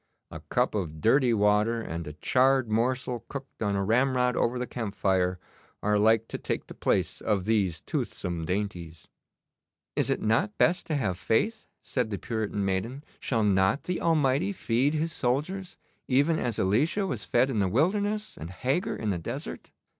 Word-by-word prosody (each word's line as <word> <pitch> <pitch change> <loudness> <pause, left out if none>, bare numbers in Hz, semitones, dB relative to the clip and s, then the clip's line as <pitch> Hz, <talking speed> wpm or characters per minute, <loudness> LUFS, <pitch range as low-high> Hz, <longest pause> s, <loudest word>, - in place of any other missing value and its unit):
A - - -7
cup - - +1
of 85 -7 -3
dirty 125 - +4
water 105 +2 +3
and 85 -7 -5
a 75 - -6
charred 130 - +2
morsel 125 +2 0
cooked 135 -3 -8
on 100 -2 +1
a 100 - 0
ramrod 125 +3 +2
over 120 +2 +1
the 125 - -2
camp 115 -5 -5
fire 90 -2 +1 0.5
are 105 0 +2
like 110 +1 +4
to - - -4
take - - -3
the - - -10
place - - 0
of 100 -4 0
these 100 -7 +1
toothsome 85 -2 -3
dainties.' 85 -3 -4 0.9
'Is - - +1
it - - +1
not 110 -1 +1
best 175 +2 +2
to 155 - -1
have 95 -10 -1
faith?' 220 - 0 0.2
said 125 -4 -1
the 100 - -3
Puritan 105 -3 -2
maiden. 110 +9 -2 0.2
'Shall 115 -4 0
not 95 +5 +2
the 180 -1 -2
Almighty 155 +2 +2
feed 140 -4 +1
His 165 +2 0
soldiers 155 +10 -1 0.3
even 145 +5 +3
as 120 -3 -2
Elisha 145 - +2
was 125 - -3
fed 125 +3 +2
in 110 - 0
the 100 - +2
wilderness 205 - 0
and 80 - -7
Hagar 130 - -1
in 110 -2 -2
the 90 - -2
desert? 80 - -6
115 Hz, 175 wpm, -28 LUFS, 100-135 Hz, 0.9 s, dirty